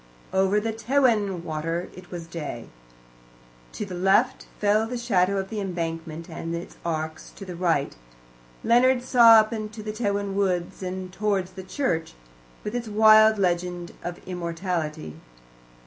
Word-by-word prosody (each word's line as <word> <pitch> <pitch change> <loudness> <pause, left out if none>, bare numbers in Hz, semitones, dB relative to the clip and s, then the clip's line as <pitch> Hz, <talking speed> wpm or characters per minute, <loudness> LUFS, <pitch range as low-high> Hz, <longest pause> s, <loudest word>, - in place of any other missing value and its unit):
Over 195 +2 +3
Tewin 225 -4 +1
Water 165 +2 -3
it 180 -1 -12
was 175 -2 -6
day. 165 -2 -6 1.0
To - - -4
the 190 - -8
left 195 +8 +2
fell 210 +2 +2
the 245 +1 -4
shadow 200 -5 +1
of 195 +1 -3
the 220 - -3
embankment 165 -3 -4
and 165 0 -5
its 170 - -8
arches; 160 -1 -4
to 195 - -9
the 180 -2 -7
right 170 -5 0 0.7
Leonard 245 +1 +4
saw 240 -3 +7
up 220 0 +5
into 215 0 -5
the 215 - -3
Tewin 200 -3 -1
Woods 185 -3 -1
and 185 0 -5
towards 195 -3 -1
the 190 - -8
church, 185 - -2 0.5
with 210 - -4
its 240 -1 -3
wild 215 0 +6
legend 175 -2 -1
of 175 0 -5
immortality. 170 - -4
190 Hz, 145 wpm, -25 LUFS, 170-215 Hz, 1.0 s, saw